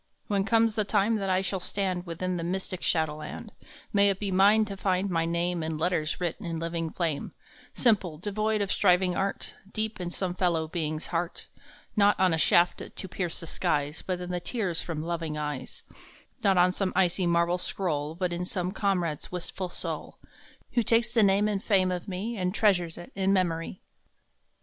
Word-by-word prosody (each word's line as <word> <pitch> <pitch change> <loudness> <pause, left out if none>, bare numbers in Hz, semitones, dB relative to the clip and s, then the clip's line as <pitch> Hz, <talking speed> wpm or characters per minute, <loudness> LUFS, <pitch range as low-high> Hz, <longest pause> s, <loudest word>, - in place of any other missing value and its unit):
When 200 -2 0
comes 225 0 +3
the 215 - +1
time 210 +2 +2
that 195 -2 -2
I 185 0 +3
shall 190 0 -2
stand 185 -1 -2
Within 180 +2 -2
the 170 - -3
mystic 185 +1 -3
shadowland, 155 -2 -2 0.4
May 200 0 +5
it 195 - -1
be 200 -2 -2
mine 205 +4 +5
to 200 -2 -6
find 190 0 0
my 165 -1 +1
name 170 +1 0
In 160 0 -2
letters 160 -1 0
writ 175 -2 -1
in 165 -1 -4
living 165 0 -2
flame, 160 -4 -2 0.4
Simple, 195 - +2
devoid 215 +4 -1
of 200 - -1
striving 180 -2 +3
art, 195 +1 -2 0.2
Deep 220 -2 -3
in 175 - -3
some 180 0 -2
fellow 170 -3 +1
being 155 -1 -2
s 155 - -6
heart* 170 +1 -3 0.5
Not 205 -1 +4
on 185 -2 +4
a 160 - +1
shaft 175 +2 +4
to 190 - -6
pierce 180 -2 -3
the - - -6
skies, 145 -1 -1
But 185 -1 -2
in 180 0 -5
the 180 - -1
tears 185 -4 -1
from 160 -3 -4
loving 165 -2 -3
eyes; 150 -3 -5 0.6
Not 195 -2 +4
on 180 +1 +5
some 190 0 -1
icy 180 0 +3
marble 170 +1 +2
scroll, 155 -5 -2
But 180 0 -1
in 175 +1 -2
some 180 0 -2
comrade 180 -7 0
s - - -9
wistful 180 +1 -4
soul, - - -6 0.5
Who 240 - +2
takes 230 +1 +2
the 230 - +4
name 200 +1 +4
and 205 -2 -1
fame 190 -3 +3
of 180 -1 -4
me 205 +5 -3
And 185 0 -1
treasures 180 -7 +2
it 175 - -10
in 195 0 +1
memory 175 -2 -1
180 Hz, 190 wpm, -28 LUFS, 170-195 Hz, 0.6 s, May